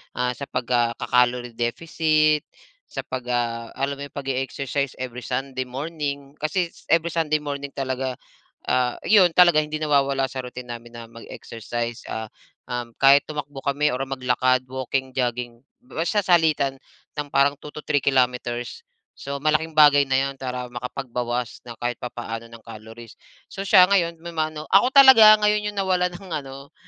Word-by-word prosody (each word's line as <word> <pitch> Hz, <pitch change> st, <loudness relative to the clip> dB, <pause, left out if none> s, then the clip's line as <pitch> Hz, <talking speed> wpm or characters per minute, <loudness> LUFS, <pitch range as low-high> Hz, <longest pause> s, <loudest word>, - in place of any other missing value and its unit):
ah, 125 Hz, 0 st, 0 dB
sa 140 Hz, -, -5 dB
pag 125 Hz, -, -3 dB
ah 120 Hz, -1 st, +2 dB
...kaka-calorie 125 Hz, 0 st, +1 dB
deficit. 155 Hz, +4 st, +1 dB, 0.4 s
Sa -, -, -5 dB
pag 130 Hz, -1 st, -6 dB
ah, 115 Hz, -1 st, -2 dB
alam 140 Hz, +1 st, -2 dB
mo 140 Hz, -, -5 dB
yong 140 Hz, -, -15 dB
pag-e-exercise 135 Hz, 0 st, -3 dB
every 125 Hz, -1 st, -5 dB
sunday 130 Hz, 0 st, -3 dB
morning. 140 Hz, 0 st, -5 dB
Kasi, 170 Hz, +3 st, -1 dB, 0.2 s
every 165 Hz, 0 st, +2 dB
sunday 155 Hz, -2 st, 0 dB
morning 140 Hz, -1 st, -5 dB
talaga, 130 Hz, -1 st, -2 dB, 0.6 s
ah, 125 Hz, -1 st, +1 dB
'yon 185 Hz, -5 st, +6 dB
talaga, 175 Hz, -3 st, +6 dB
hindi 150 Hz, 0 st, -5 dB
nawawala 140 Hz, -3 st, +1 dB
sa 130 Hz, -, -5 dB
routine 125 Hz, 0 st, -9 dB
namin 120 Hz, 0 st, -9 dB
na 115 Hz, -, -8 dB
mag-exercise. 115 Hz, 0 st, -6 dB
Ah, 110 Hz, -1 st, -5 dB, 0.4 s
um, 120 Hz, -1 st, -4 dB
kahit 140 Hz, +1 st, +6 dB
tumakbo 145 Hz, -2 st, -6 dB
kami 145 Hz, +1 st, +1 dB
or 130 Hz, +2 st, -2 dB
maglakad, 130 Hz, -1 st, +1 dB
walking, 130 Hz, 0 st, -3 dB
jogging, 120 Hz, -1 st, -2 dB, 0.2 s
basta 205 Hz, -3 st, -1 dB
salitan 155 Hz, -6 st, +2 dB, 0.4 s
ng 145 Hz, -, -3 dB
parang 140 Hz, +1 st, +3 dB
2-3 150 Hz, 0 st, -2 dB
kilometers. 125 Hz, -, 0 dB, 0.3 s
So, 140 Hz, 0 st, -6 dB
malaking 155 Hz, +2 st, 0 dB
bagay 145 Hz, -2 st, +6 dB
na 130 Hz, -, +3 dB
'yon, 135 Hz, -1 st, -7 dB
para 125 Hz, -1 st, -4 dB
makapagbawas 125 Hz, -1 st, -4 dB
ng 115 Hz, -, -9 dB
kahit 120 Hz, +1 st, -4 dB
papaano, 115 Hz, -1 st, -6 dB
ng 115 Hz, -1 st, -14 dB
calories. 115 Hz, +1 st, -11 dB, 0.4 s
So, 195 Hz, -, -7 dB
siya 185 Hz, -2 st, +7 dB
ngayon 170 Hz, -4 st, +2 dB
may 170 Hz, 0 st, -7 dB
ma-ano 155 Hz, -1 st, -3 dB
Ako 200 Hz, +6 st, +6 dB
talaga 260 Hz, -6 st, +9 dB
ngayon, 210 Hz, 0 st, +2 dB
yong 205 Hz, -, -10 dB
nawalan 185 Hz, -2 st, +1 dB
ng 195 Hz, 0 st, -13 dB
ano, 140 Hz, -1 st, -7 dB
135 Hz, 155 wpm, -23 LUFS, 125-155 Hz, 0.6 s, talaga